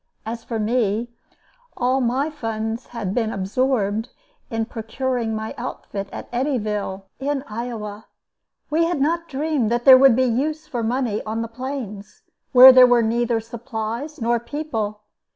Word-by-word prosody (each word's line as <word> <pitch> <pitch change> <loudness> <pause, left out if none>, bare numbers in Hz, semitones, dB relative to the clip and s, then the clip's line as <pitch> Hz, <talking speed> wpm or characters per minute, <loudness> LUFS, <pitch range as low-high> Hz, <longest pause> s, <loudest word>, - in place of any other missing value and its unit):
As 230 +1 -5
for 230 - -4
me, 220 0 0 0.7
all 255 +2 +1
my 260 +5 0
funds 225 -4 -4
had 215 -6 -4
been 225 -2 0
absorbed 220 +2 0 0.4
in 225 -2 -1
procuring 230 0 -3
my 220 0 -4
outfit 195 -1 -5
at - - -7
Eddyville, 215 -7 -2 0.2
in 275 0 -2
Iowa. 215 -2 -6 0.6
We 330 +2 +3
had 340 -3 -1
not 335 +4 0
dreamed 285 -4 0
that 240 +1 -1
there 260 -1 +10
would 270 -3 +7
be 260 - +3
use 300 +6 -1
for 260 -6 -4
money 230 -2 -1
on 220 +1 -3
the - - -4
Plains, 230 -4 -7 0.3
where 260 0 +11
there 255 -1 +8
were 245 -1 +4
neither 235 +1 +1
supplies 230 +4 -5
nor 235 0 +1
people. 230 -5 -4
235 Hz, 150 wpm, -22 LUFS, 220-265 Hz, 0.7 s, where